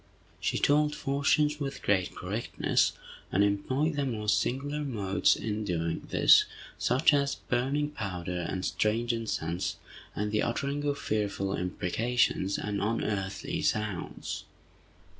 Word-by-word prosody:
She - - 0
told 150 +1 +3
fortunes 145 +2 +1
with 140 -1 -4
great 95 -3 +1
correctness, 105 +6 0 0.4
and 100 - +4
employed 130 +10 +1
the 140 - +1
most 105 -4 +1
singular 145 +4 -2
modes 105 -8 +2
in 110 -1 -3
doing 85 -4 -2
this, - - +6 0.3
such 135 +5 +4
as 140 -1 +2
burning 140 +4 -1
powder 90 - -4
and 95 0 -2
strange 115 +3 +1
incense, 90 -7 -2 0.4
and 105 0 -1
the 105 - +2
uttering 140 +4 -1
of 145 -1 0
fearful 100 -4 -1
imprecations, 100 +3 0
and 100 -2 -2
unearthly 105 -3 -2
sounds. 105 -4 -2
110 Hz, 120 wpm, -29 LUFS, 100-140 Hz, 0.4 s, this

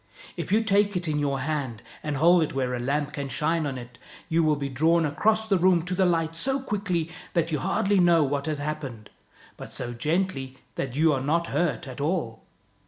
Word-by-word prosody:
If - - -5
you 220 +2 +4
take 205 -2 +2
it 175 -1 -3
in 150 -1 0
your 140 -2 0
hand 135 -6 -3 0.2
and 150 -2 -3
hold 170 +4 +5
it 155 - -1
where 130 -2 0
a 125 - -2
lamp 145 +3 -1
can 140 -1 -4
shine 155 +4 0
on 135 -2 -4
it, 120 0 -10 0.3
you 165 0 +3
will 155 -2 +3
be 140 -1 -3
drawn 160 +5 +2
across 215 +9 +1
the 195 -4 +2
room 180 -2 +4
to 180 +1 -3
the 185 0 +3
light 165 -2 +1
so 270 +11 0
quickly 195 -9 -2 0.2
that 170 -1 +1
you 150 - 0
hardly 200 +7 +1
know 170 -3 +5
what 140 +1 -1
has 155 -1 -1
happened, 145 -7 -5 0.5
but - - -9
so 120 -1 -4
gently 135 -1 -1 0.2
that 130 -2 -4
you 155 +1 +4
are 135 - -1
not 165 +5 +1
hurt 170 -5 0
at 130 +1 -7
all. 145 -8 -1
155 Hz, 215 wpm, -26 LUFS, 135-175 Hz, 0.5 s, hold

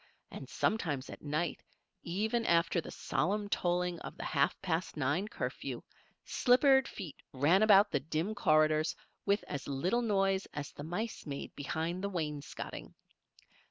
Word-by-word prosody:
And - - -8
sometimes 150 -11 -1
at - - -10
night, 155 +3 -2 0.4
even 220 +7 0
after 170 0 +3
the - - -9
solemn 195 +9 -1
tolling 175 -2 0
of - - -8
the - - -5
half 140 -2 +1
past 170 -3 -1
nine 150 +8 0
curfew, - - -4 0.4
slippered 265 +1 +4
feet 180 -8 -7 0.2
ran 150 +9 +4
about 205 -1 +6
the 145 - +2
dim 160 +8 -2
corridors 155 -4 +3 0.3
with 200 +2 +3
as 140 -2 -5
little 175 - +1
noise 195 -3 +1
as 145 -1 -4
the 145 - -8
mice 180 +5 -4
made 140 -1 -5
behind 160 +5 -3
the 200 - 0
wainscoting. 150 -6 -5
175 Hz, 145 wpm, -33 LUFS, 150-200 Hz, 0.4 s, about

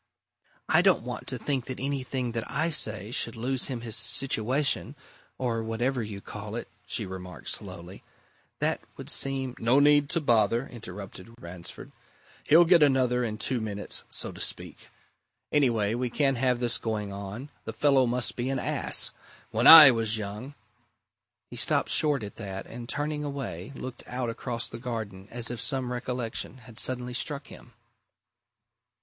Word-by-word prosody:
"I - - +5
don't - - +3
want - - -6
to - - 0
think 135 -4 -2
that 130 - -6
anything 130 -2 -2
that 115 -1 -4
I 165 +2 0
say 110 -7 +1
should 115 -1 -1
lose 125 +3 0
him 125 -4 -4
his 115 -2 -1
situation 135 +2 +1 0.4
or 120 -3 -1
whatever 120 +3 -1
you 105 -2 -6
call 105 +1 -7
it," 120 - -5 0.2
she 110 - -2
remarked 90 -1 -7
slowly. 90 -2 -6 0.6
"That - - 0 0.2
would - - -5
seem 135 -2 0
" - - -14
"No 120 +4 +4
need 145 0 +5
to 170 - +1
bother," 115 -3 +2
interrupted 100 -1 -10
Ransford. 85 0 -8 0.5
"He'll 165 +3 +6
get 170 -1 +6
another 130 -3 +3
in 110 -2 -3
two 125 +1 -1
minutes 105 -2 -2
so - - -2
to - - -12
speak. - - -2 0.6
Anyway, 115 -8 +2
we 125 +1 -1
can't 135 +1 +1
have 125 0 +1
this 120 -1 0
going 105 -3 -3
on. 100 +8 -7
The - - -4
fellow 130 +2 +3
must 120 0 0
be 125 +2 -2
an 135 - -1
ass! - - +2 0.4
When - - +2
I 155 -4 +13
was 115 -2 +1
young 105 +7 -6 0.5
" - - -60
He - - -8
stopped - - +2
short 145 -6 +2
at 100 - -8
that, 95 -3 -6
and 120 +1 -9
turning 150 +1 -2
away, 130 - -5
looked 130 -1 -7
out 125 -1 -3
across 115 0 -4
the - - -8
garden 110 -6 -5
as 120 0 -1
if 120 - -4
some 130 -3 -1
recollection 125 0 -4
had 115 -3 -12
suddenly 125 -1 -3
struck 140 +2 -4
him. - - -14
120 Hz, 165 wpm, -27 LUFS, 110-135 Hz, 0.6 s, I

